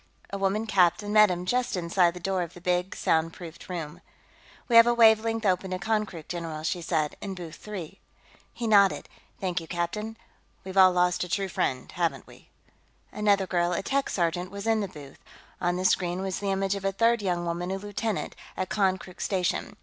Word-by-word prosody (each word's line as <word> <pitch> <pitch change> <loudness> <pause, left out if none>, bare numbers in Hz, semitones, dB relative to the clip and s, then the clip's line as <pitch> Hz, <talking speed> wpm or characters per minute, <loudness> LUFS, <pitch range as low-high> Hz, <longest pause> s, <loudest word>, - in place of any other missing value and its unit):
A 200 - -3
woman 195 +3 0
captain 205 0 +2
met 215 -1 +7
him 180 0 -3
just 245 0 0
inside 175 0 +2
the - - -7
door 190 +1 -1
of 170 0 -5
the - - -10
big 180 +1 -1
soundproofed 165 +2 -2
room. 170 -1 -5 0.7
"We 235 - +1
have 230 0 +9
a 240 - +3
wavelength 225 -1 +4
open 190 0 +1
to 185 - -2
Konkrook, 195 -4 -2
general," 165 -3 -5
she 175 +2 -1
said. 160 -3 -1
"In 195 -2 -5
booth 170 -3 -8
three." 195 -4 -8 0.5
He 235 - -5
nodded. 200 -3 +4 0.3
"Thank 180 -2 -1
you, 165 - -10
captain.... 210 +6 -3 0.5
We've 190 0 -8
all 190 -1 +7
lost 180 0 +2
a 180 - -6
true 195 +1 -1
friend, 130 -6 -2
haven't 175 -2 -1
we?" - - -17 0.6
Another 205 -2 +2
girl, 175 -1 0
a 185 - -2
tech 275 +5 0
sergeant, 175 0 -1
was 200 +1 -7
in 225 -1 +2
the 200 - -2
booth; 145 -5 -12 0.4
on 175 0 +1
the 185 +1 -2
screen 180 0 +1
was 190 -1 -3
the 200 - -2
image 195 0 0
of 200 -1 -5
a 195 - +1
third 230 +3 +2
young 175 -3 -1
woman, 170 +1 -3
a 190 - -2
lieutenant, 205 +1 -3 0.2
at 185 - -2
Konkrook 190 -3 -1
station. 185 -3 -1
185 Hz, 195 wpm, -27 LUFS, 175-205 Hz, 0.7 s, have